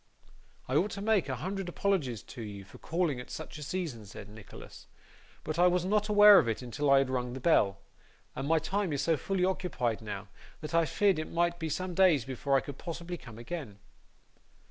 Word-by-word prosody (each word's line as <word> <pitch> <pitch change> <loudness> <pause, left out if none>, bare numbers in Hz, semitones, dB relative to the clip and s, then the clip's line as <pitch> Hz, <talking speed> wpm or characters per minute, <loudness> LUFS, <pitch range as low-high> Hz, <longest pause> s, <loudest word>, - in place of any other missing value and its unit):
'I 130 - +1
ought 190 +7 +2
to - - -5
make 205 -8 +2
a 130 - -1
hundred 190 - -4
apologies 165 - -1
to 125 - -10
you 100 -3 -7
for 95 - -15
calling 165 -6 -1
at 125 - -9
such 160 -1 -7
a - - -9
season,' 150 -7 -4
said 100 +1 -10
Nicholas, 105 -1 -12 0.6
'but 155 +2 -3
I 180 - +6
was 180 0 +1
not 210 +2 +1
aware 210 -1 +9
of - - 0
it 115 +3 -3
until 140 +4 -2
I 140 - +7
had 135 -1 +2
rung 125 -1 -2
the 130 - -5
bell, 105 -10 +3 0.6
and 135 - -3
my 165 +1 +4
time 185 +2 -1
is 140 -1 -1
so 165 +2 +3
fully 180 +5 -1
occupied 175 - -1
now, 105 -2 -6 0.3
that 155 +1 -7
I 165 0 +4
feared 195 +3 +2
it 155 - -5
might 175 0 0
be 160 -1 -3
some 180 +4 -3
days 170 -9 +4
before 135 +1 0
I - - +1
could 140 -1 -9
possibly 170 0 -5
come 125 -8 -12
again. 120 - -6
155 Hz, 210 wpm, -30 LUFS, 125-180 Hz, 0.6 s, aware